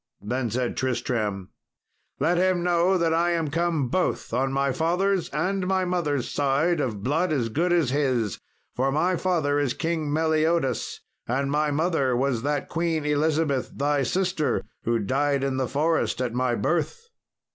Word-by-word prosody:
Then 120 +4 -2
said 120 +2 -2
Tristram, 115 -6 -2 0.7
"Let 175 +1 +2
him 185 -1 +2
know 175 +2 +3
that 165 -2 +1
I 170 +1 +2
am 160 -4 -1
come 165 -4 0
both 180 -3 -1
on 135 +2 +1
my 135 0 +1
father's 180 +6 0
and 185 +5 -1
my 190 -1 +1
mother's 160 -8 -1
side 145 +4 +1
of 110 -8 -2
blood 160 +8 +1
as 125 -7 0
good 170 +10 0
as 165 -7 +2
his, 130 -7 0 0.4
for 135 +2 +1
my 175 +6 +1
father 160 -6 +1
is 135 -3 0
King 160 -3 -2
Meliodas 160 -1 0 0.3
and 135 +3 0
my 150 +1 +1
mother 145 -4 +1
was 130 -3 0
that 145 +2 -1
Queen 165 -2 -1
Elizabeth, 150 -2 +1
thy 145 0 +1
sister, 170 -2 0 0.2
who 115 0 +2
died 135 +6 0
in 135 -1 -1
the 130 -1 0
forest 155 +2 0
at 125 -2 -1
my 125 -1 +1
birth." 165 - -1
145 Hz, 160 wpm, -25 LUFS, 130-170 Hz, 0.7 s, know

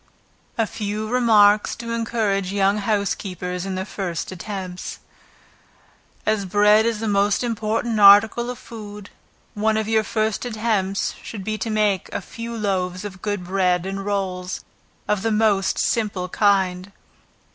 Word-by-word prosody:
A 225 - +2
few 210 0 -4
Remarks 215 -4 +4
to 230 0 -6
Encourage 220 -5 -1
Young 200 +1 +2
Housekeepers 195 -3 -2
in 190 - -3
their 185 0 -3
First 180 -5 -4
Attempts. 185 -1 -6 1.3
As 215 -2 +1
bread 210 +3 +4
is 230 -2 -1
the 225 - -2
most 205 +2 +2
important 225 0 -1
article 210 +4 +7
of 250 - -5
food, 210 -3 -10 0.4
one 215 +1 +1
of 220 -1 -1
your 220 -1 +2
first 215 -1 -1
attempts 215 -4 -1
should 205 -4 -7
be 215 +2 -3
to 230 - -3
make 210 -3 +1
a - - -2
few 230 +4 -7
loaves 185 -2 -2
of 190 -2 -8
good 205 -3 -2
bread 180 -1 +1
and 195 +1 -4
rolls, 185 -3 -3 0.5
of 210 -2 +1
the 225 - 0
most 210 -3 +2
simple 205 -5 0
kind. 190 -2 +1
205 Hz, 145 wpm, -22 LUFS, 195-220 Hz, 1.3 s, article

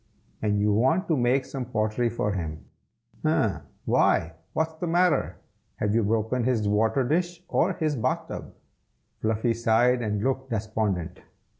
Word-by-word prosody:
And 105 -1 +1
you 105 0 +2
want 130 - +2
to 160 - +3
make 130 +1 +2
some 135 -1 -5
pottery 115 0 0
for 110 -2 -1
him, 80 -5 -5 0.6
eh? - - +1 0.3
why, 80 0 +2 0.2
what's 160 0 0
the 165 +2 -4
matter? 175 +1 +2 0.4
have 105 -1 -1
you 115 - +3
broken 110 +3 0
his 115 -4 +1
water 110 +6 +2
dish, 175 +3 -1
or 190 - +2
his 155 -3 -1
bath 115 - -1
tub?" - - -7 0.7
Fluffy 110 +2 +1
sighed 115 +2 +3
and 105 -2 -1
looked 130 +1 -1
despondent. 105 -6 -2
115 Hz, 150 wpm, -26 LUFS, 105-135 Hz, 0.7 s, to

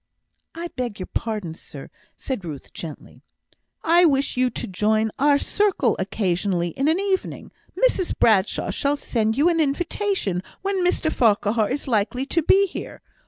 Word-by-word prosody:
"I 340 +1 -5
beg 245 -8 -5
your 185 - -4
pardon, 210 -8 -3
sir," - - -9 0.3
said 260 -8 -4
Ruth, 150 -5 -8
gently. 160 -3 -9 0.6
"I 340 +2 +5
wish 280 -4 +2
you 255 0 +2
to - - -5
join 215 +3 +1
our 285 +1 +5
circle 370 - +1
occasionally 185 -2 0
in 270 - -1
an 320 +4 +2
evening; 390 -1 -2 0.3
Mrs 455 -8 +1
Bradshaw 205 -4 +2
shall 285 +1 0
send 220 -4 -1
you 295 +4 +4
an 340 -1 +2
invitation 315 - 0 0.2
when 390 -2 0
Mr 355 -3 +1
Farquhar 215 -1 +2
is 285 +2 -3
likely 235 +2 0
to 335 +4 0
be 390 +5 +4
here. 375 - -8
255 Hz, 155 wpm, -23 LUFS, 210-335 Hz, 0.6 s, I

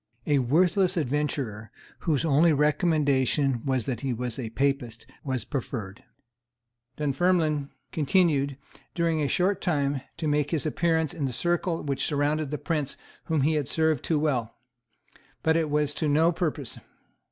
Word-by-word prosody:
A 145 -2 +3
worthless 180 - +2
adventurer, 135 -7 -2 0.3
whose 155 -2 0
only 160 +2 +4
recommendation 145 -4 +2
was 130 -4 0
that 125 -5 -3
he 135 -2 -1
was 120 +1 -4
a 115 -3 -4
Papist, 125 -2 -1 0.2
was 130 -5 -2
preferred. 115 -7 -5 0.9
Dunfermline 150 0 +1 0.2
continued, 145 -4 +2 0.4
during 165 -2 +1
a 145 - +1
short 185 +7 +1
time, 140 -5 0 0.2
to 165 -2 -2
make 150 -1 +1
his 160 -2 -1
appearance 160 0 +1
in 145 - -2
the 130 - -2
circle 175 +6 0
which 140 -2 -2
surrounded 150 0 0
the 150 - -2
Prince 150 -5 -2 0.3
whom 160 -3 +1
he 155 +4 +2
had 150 -3 0
served 160 -3 +1
too 160 - +1
well; 130 -7 -1 0.9
but 160 0 +3
it 160 -2 +1
was 150 0 +1
to 155 - -1
no 160 +4 +4
purpose. 155 - -3
150 Hz, 150 wpm, -27 LUFS, 135-160 Hz, 0.9 s, only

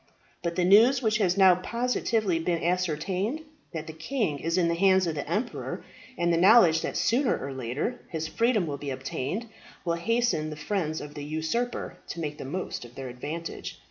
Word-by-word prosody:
But 170 -1 -2
the 180 - +2
news 235 +8 +6
which 215 0 +2
has 185 -2 +2
now 190 -2 +8
positively 220 -2 0
been 165 0 -1
ascertained, 185 - 0 0.3
that 160 -3 -5
the 160 - -8
king 160 - -2
is 165 +4 -1
in 175 -2 +3
the 170 - +1
hands 190 +1 +4
of 165 - -1
the 145 - -5
emperor, 220 +5 -3 0.3
and 170 0 +2
the - - +3
knowledge 180 -4 +6
that - - -3
sooner 245 +3 +2
or 135 0 -5
later 130 - -3
his 160 -2 -3
freedom 215 +5 +2
will 145 -3 -4
be 145 - -5
obtained, 135 - -3 0.4
will 170 - +1
hasten 200 -3 +1
the 155 - -6
friends 155 -1 -2
of 145 0 -8
the 145 - -6
usurper 160 +12 -2
to - - -6
make 150 -2 -4
the - - -6
most 180 +2 -4
of 120 0 -13
their 135 -1 -6
advantage. 150 +7 -6
170 Hz, 195 wpm, -27 LUFS, 155-210 Hz, 0.4 s, now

